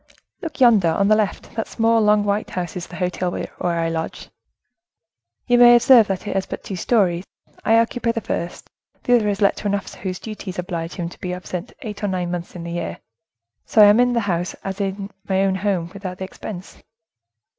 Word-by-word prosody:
"Look 315 -4 -6
yonder, 225 -8 +6
on 200 +5 +2
the 215 - +6
left, 215 -2 -2
that 225 -1 -3
small, 225 0 +2
long 210 -1 +4
white 205 +1 -1
house 175 -2 -4
is 180 -2 -5
the 180 - -10
hotel 180 0 -1
where - - -5 0.3
I 165 - +1
lodge. 165 0 -4 1.1
You 245 0 +3
may 240 0 +9
observe 240 -2 +7
that 195 0 -3
it - - -3
has 195 - -1
but - - -6
two 195 - -5
stories; 180 -3 +1 0.4
I 225 - +4
occupy 230 +1 +1
the 230 - -2
first; 175 -4 -4 0.4
the 245 - +4
other 215 -3 0
is 200 0 -2
let 200 - +3
to 210 - -3
an 200 - +1
officer 200 - -6
whose 185 -2 -4
duties 210 -3 -7
oblige 175 -2 -4
him 175 -2 -4
to - - -15
be 180 -1 -3
absent 180 -1 -6
eight 210 -3 -7
or - - +1
nine 180 -2 -2
months 175 0 -5
in 170 - -6
the 170 - -6
year,—so 160 - -6
I 210 - +11
am 205 +3 +6
in 245 0 +4
that 235 - +1
house 180 -3 -2
as 195 +1 -4
in 195 +1 -3 0.2
my 190 0 +2
own 195 -1 +2
home, 190 -3 -1
without 190 -2 -6
the 190 - -5
expense." 190 0 -9
195 Hz, 215 wpm, -21 LUFS, 180-215 Hz, 1.1 s, I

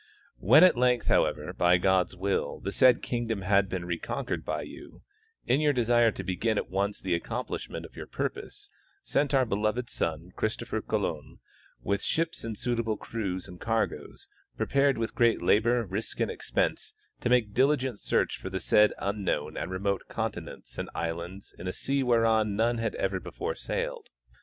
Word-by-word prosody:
When 135 - +7
at 185 - +7
length, 125 0 +2
however, - - +1
by 90 0 +4
God's 95 0 +2
will, 95 +2 -1
the 100 - -4
said 125 +2 +5
kingdom 115 -4 -2
had 100 0 +3
been 90 -2 -3
reconquered 85 -1 -3
you, - - -12 0.4
in 135 +4 +2
your 150 -1 +3
desire 120 -2 +4
to - - -6
begin 105 +4 0
at - - -3
once 100 +2 -1
the 95 -2 -1
accomplishment 85 - -4
of - - -14
your - - -7
purpose, - - -5 0.3
sent 145 -1 +1
our 130 -1 +4
beloved 110 +3 -1
son, 80 +2 -3
Christopher - - -2
Colon, - - -3 0.5
with 100 +7 0
ships 165 0 0
and 110 -2 -4
suitable 115 -3 -1
crews 95 -6 -4
and 90 -1 -12
cargoes, 115 -1 -2 0.3
prepared 140 -1 +2
with 115 0 -2
great 120 -2 +3
labor, 115 +2 +3
risk 100 +4 -5
and - - +1
expense, - - -2 0.2
to 120 - -1
make 120 -5 +3
diligent 130 -3 +2
search - - 0
for 95 - -6
the 95 0 -3
said 105 +3 +4
unknown 100 -7 -2
and - - -3
remote 100 +1 -1
conti - - -2
nents - - -11
and - - -4
islands 85 +4 -5
in 90 - -6
a 90 - -2
sea 140 0 -1
whereon 115 -4 +3
none 115 +2 +1
had 115 -1 -2
ever 95 -1 -1
before. 445 - -4
sailed. - - -4
110 Hz, 170 wpm, -28 LUFS, 95-125 Hz, 0.5 s, When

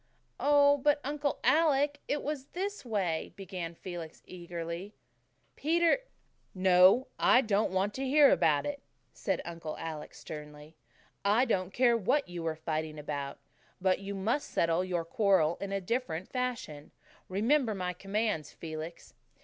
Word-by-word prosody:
"Oh, 285 +1 +5
but 290 +2 +3
Uncle 285 +1 -1
Alec, 290 -2 +3
it 290 - -1
was 285 -2 -4
this 400 +3 -3
way," 195 -9 -2
began 180 -3 -6
Felix 170 -3 -8
eagerly. 170 +2 -6 0.6
"Peter 340 +7 +3 0.3
" - - -43 0.2
"No, 185 +6 +6
I 250 - +6
don't 215 -3 +1
want 190 +2 0
to 270 - -4
hear 285 +1 +6
about 150 -2 +3
it," 285 -1 -4 0.3
said - - -2
Uncle 165 -2 -6
Alec 160 -2 -6
sternly. 150 0 -10 0.5
"I 210 +6 +4
don't 185 -6 0
care 240 +2 +4
what 230 +6 +1
you 175 -1 -6
were 165 -1 -2
fighting 155 -1 -3
about, 145 -2 -4 0.4
but 185 0 +2
you 200 0 -5
must 225 +9 -1
settle 165 +1 +1
your 175 -3 -2
quarrels 175 -3 +2
in 200 0 -4
a 195 - 0
different 185 -4 -2
fashion. 245 - -4 0.4
Remember 225 +4 +2
my 180 -1 -2
commands, 195 -4 -2
Felix. 160 +1 -8
190 Hz, 145 wpm, -31 LUFS, 165-260 Hz, 0.6 s, No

